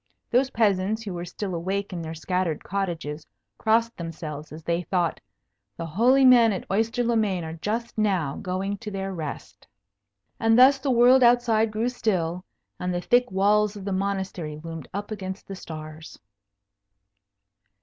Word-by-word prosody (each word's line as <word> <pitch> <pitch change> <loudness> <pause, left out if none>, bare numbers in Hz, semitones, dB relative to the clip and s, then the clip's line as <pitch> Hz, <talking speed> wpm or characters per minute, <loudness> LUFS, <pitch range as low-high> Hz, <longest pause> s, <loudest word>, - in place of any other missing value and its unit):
Those 260 +2 +3
peasants 210 -1 +1
who 200 -4 -5
were 175 0 -5
still 185 +2 -5
awake 190 +4 -2
in 170 - -4
their 160 0 -6
scattered 175 -1 -2
cottages, 170 -6 -4 0.3
crossed 230 +1 +2
themselves 155 -3 -7
as 155 +1 -9
they 170 +2 0
thought, 175 -1 -1 0.6
"The 165 - -4
holy 245 - +4
men 240 -3 +7
at 190 - -4
Oyster 225 +4 +1
le 235 0 +1
Main 200 -6 +1
are 160 0 -5
just 220 +8 -3
now 185 -10 0
going 190 +2 -3
to 225 - -6
their 195 -1 -4
rest." 160 -5 -7 0.7
And 225 0 +4
thus 270 +2 +7
the 270 - -2
world 250 +1 +6
outside 235 -2 +4
grew 220 +3 -1
still, 180 -8 -1 0.4
and 180 0 -2
the 175 - -1
thick 245 +5 +3
walls 205 +2 +2
of 200 -2 -8
the 200 - -2
Monastery 190 -5 -3
loomed 165 -1 -7
up 205 +2 -5
against 190 -2 -6
the 195 - -6
stars. 155 -2 -9
195 Hz, 160 wpm, -25 LUFS, 170-225 Hz, 0.7 s, men